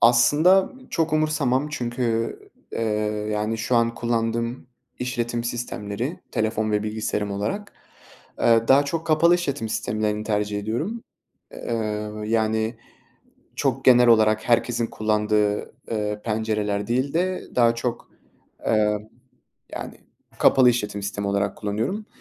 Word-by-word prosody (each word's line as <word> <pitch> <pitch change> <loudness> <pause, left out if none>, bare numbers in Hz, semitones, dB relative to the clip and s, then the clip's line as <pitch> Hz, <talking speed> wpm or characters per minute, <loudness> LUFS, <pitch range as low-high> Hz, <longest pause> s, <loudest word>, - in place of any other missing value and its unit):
aslında 145 - +5 0.2
çok 165 -1 0
umursamam 150 -3 +1
çünkü, 120 -4 -1 0.3
eee, - - -3 0.5
yani, 105 +2 -1
şu 120 +2 +1
an 115 0 +2
kullandığım 115 +1 -1 0.3
işletim 120 -1 -2
sistemleri, 120 - -4
telefon 110 0 0
ve 105 -1 +1
bilgisayarım 105 -1 -2
olarak, 105 - -3 0.7
eee, 115 -1 +4
daha 140 +2 +6
çok 165 +3 -3
kapalı 165 +2 +5
işletim 140 -10 -2
sistemlerini 105 0 -1
tercih 105 -1 -1
ediyorum. 135 - -3 0.5
Eee, - - -9
ööö, 105 -1 -3
yani, 110 +1 0 0.8
çok 135 -2 -1
genel 125 -1 +7
olarak 110 0 +4
herkesin 120 0 +2
kullandığı, 105 -1 0 0.2
eee, 105 -1 -2
pencereler 105 -2 -1
değil 130 +4 0
de 185 +2 0
daha 115 -1 +4
çok, 115 0 -4 0.5
emm, 105 -1 +2 0.7
yani, - - -7 0.4
kapalı 130 -2 +6
işletim 105 -4 -2
sistemi 100 0 -3
olarak 100 0 0
kullanıyorum. 115 - -2
115 Hz, 120 wpm, -24 LUFS, 105-125 Hz, 0.8 s, genel